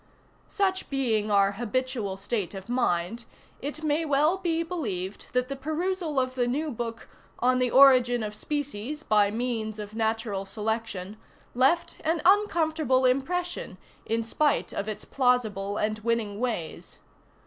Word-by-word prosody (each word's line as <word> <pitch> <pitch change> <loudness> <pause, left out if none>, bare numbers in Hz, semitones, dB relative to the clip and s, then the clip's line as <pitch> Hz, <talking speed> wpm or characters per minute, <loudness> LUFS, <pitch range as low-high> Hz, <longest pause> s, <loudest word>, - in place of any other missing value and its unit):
Such 380 -2 0
being 230 -6 0
our 200 -1 +4
habitual 235 -2 -2
state 200 -1 -3
of 195 0 -8
mind, 235 -2 0 0.4
it 295 +3 -5
may 305 +1 +1
well 300 +4 +3
be 335 -3 0
believed 210 - -4
that 250 0 +1
the 275 - -4
perusal 315 +2 -1
of 255 0 -1
the 245 -2 0
new 295 +5 -1
book 230 -1 -5 0.3
"On 255 +1 +2
the 250 -1 +2
Origin 250 -3 +6
of 210 0 -4
Species 290 +3 -4
by 210 -4 +4
Means 220 -1 -2
of 210 0 -7
Natural 220 -3 -1
Selection" 210 -1 -3 0.4
left 270 +8 +2
an 325 +1 +1
uncomfortable 315 - +3
impression, 275 - -1 0.3
in 230 +1 -1
spite 295 +6 +1
of 205 +2 -3
its 215 - -6
plausible 220 -6 +1
and 215 0 -1
winning 215 -2 -1
ways. 230 -10 -4
245 Hz, 140 wpm, -27 LUFS, 215-295 Hz, 0.4 s, Origin